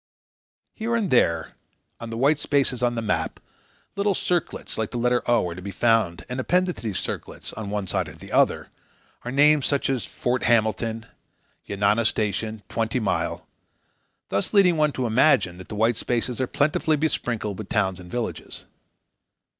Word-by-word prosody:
Here 235 +1 -2
and 215 -6 0
there, 85 -10 +2 0.5
on 115 - -7
the 115 - -5
white 140 +4 +3
spaces 135 -5 +1
on 120 -1 +1
the 115 - -2
map, 105 - -1 0.6
little 200 -1 +1
circlets 175 -2 -2
like 110 -2 -2
the 120 - -5
letter 125 +1 +2
"o" 120 -6 +3
are 85 - -4
to 90 - -9
be 100 - -6
found, 100 -4 +1
and, 125 +1 -4
appended 180 +6 +1
to - - -10
these 105 -5 -3
circlets, - - -5
on 110 -2 -6
one 105 -1 -2
side 90 - -1
or - - -12
the - - -12
other, - - +2 0.5
are 125 - -4
names 145 +1 +4
such 140 -1 +1
as 130 -4 -1
"Fort 125 +1 -2
Hamilton," 115 0 +1 0.6
"Yanana 100 +3 +2
Station," 110 0 -2
"Twenty 115 +2 -1
Mile," 105 -5 -1 0.8
thus 100 - -1
leading 185 -4 +6
one 150 -1 +2
to 130 - -2
imagine 110 - +3
that 95 - -11
the 110 - -5
white 110 +2 +2
spaces 120 0 -2
are 130 - 0
plentifully 150 +3 +1
besprinkled 120 -9 -2
with 110 - -7
towns 95 -4 0
and 90 -1 -11
villages. 120 +2 -5
115 Hz, 175 wpm, -24 LUFS, 105-140 Hz, 0.8 s, leading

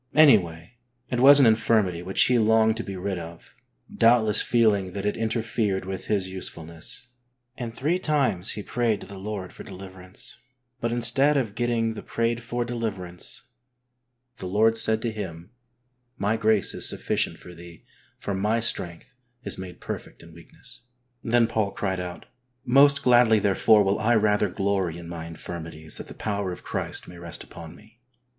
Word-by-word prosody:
Anyway, 100 - +4 0.4
it 125 - 0
was 140 +3 +9
an 135 - +7
infirmity 110 -5 +2
which 95 +2 +2
he 125 -1 +3
longed 110 0 +4
to 115 - -4
be 100 - -6
rid 95 0 -3
of, 85 0 -11 0.4
doubt 115 0 +5
less 105 -1 +3
feeling 105 -6 +2
that 100 0 -4
it 105 - 0
interfered 110 -4 -1
with 95 0 -6
his 100 -3 0
usefulness, 85 +3 -7 0.5
and 115 -3 -6
three 160 +8 0
times 140 - 0
he 105 - -6
prayed 115 -2 0
to - - -8
the 100 -1 -10
Lord 100 -2 -6
for - - -11
deliverance, 95 0 -11 0.4
but 115 -1 -1
instead 125 +5 +2
of 115 -7 -1
getting 115 -1 0
the - - -7
prayed 115 0 -1
for 120 +1 -3
deliverance, 95 - -4 0.9
the 95 - -6
Lord 110 +4 +3
said 110 0 +1
to 115 - -1
him, 90 -3 -7 0.7
"My 105 +3 0
grace 110 -3 +2
is - - 0
sufficient - - -2
for 90 - -12
thee 85 -1 -13 0.3
for 100 - -4
My 105 +4 +1
strength 90 -5 -3 0.3
is - - -4
made 90 -1 -8
perfect - - -7
in 85 0 -15
weakness.*' 85 0 -11 0.4
Then 120 0 +3
Paul 110 -3 -1
cried 95 -2 -2
out, 90 -1 -6 0.4
"Most 140 +2 +5
gladly, 120 -3 +5
therefore, 105 +1 +4
will 100 +2 +1
I 115 +2 +3
rather 105 -1 +2
glory 95 -3 -1
in 85 -1 -9
my 85 -1 -7
infirmities 80 -1 -7
that - - -8
the - - -10
power 100 -3 -2
of 90 - -8
Christ - - -2
may 90 -1 -11
rest 85 -1 -6
upon 85 0 -11
me. 110 +4 -20
105 Hz, 170 wpm, -25 LUFS, 90-115 Hz, 0.9 s, was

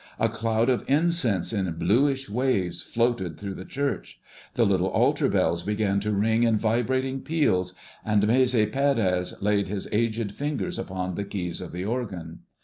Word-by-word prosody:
A - - +2
cloud 115 +1 0
of 125 -2 +1
incense 140 - +1
in 95 -4 -1
bluish 135 - +1
waves 110 -5 0
floated 115 -9 -1
through 100 -1 -5
the 95 - -8
church. 140 +7 -3 0.4
The 120 - +3
little 95 -2 +2
altar - - +2
bells 85 0 +1
began 105 0 0
to 105 +1 -2
ring 110 +3 +2
in 115 -2 +3
vibrating 130 +4 0
peals, 95 - 0 0.3
and 105 -1 +2
Maese 125 +3 +3
Pérez 105 -5 +1
laid 100 -1 +2
his 100 0 -4
aged 110 -1 0
fingers 150 - -3
upon 95 -1 -4
the 100 - -3
keys 95 -3 -3
of 90 - -7
the 90 +2 -4
organ. 95 -8 -4
105 Hz, 160 wpm, -26 LUFS, 95-125 Hz, 0.4 s, The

